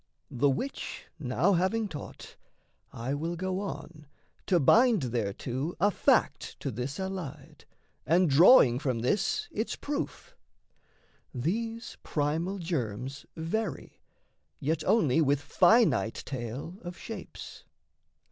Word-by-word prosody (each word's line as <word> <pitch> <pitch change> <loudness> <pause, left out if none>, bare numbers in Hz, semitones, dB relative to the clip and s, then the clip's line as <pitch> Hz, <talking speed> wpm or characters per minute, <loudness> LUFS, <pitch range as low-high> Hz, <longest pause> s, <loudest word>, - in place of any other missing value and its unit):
The 140 +3 +2
which 260 - -4
now 150 +7 +2
having 190 +5 +1
taught, 150 -7 -9 0.6
I 120 +4 -4
will 165 +4 -2
go 185 +2 -2
on 170 -6 -7 0.4
To 180 -3 +4
bind 225 - +5
thereto 120 - -2
a 205 +4 +4
fact - - +1
to - - -2
this 130 +6 -4
allied 160 -6 -6 0.4
And 175 +2 +3
drawing 140 - +7
from 130 -5 -1
this 190 - 0
its 220 +3 -2
proof: 290 0 -5 1.0
these 225 - -3
primal 160 +6 -1
germs 135 - -4
Vary, 165 0 -3 0.6
yet 155 +2 -1
only 165 - +3
with 145 -2 +2
finite 160 - +3
tale 130 - -6
of 175 0 -8
shapes. 225 - -9
160 Hz, 110 wpm, -29 LUFS, 135-190 Hz, 1.0 s, drawing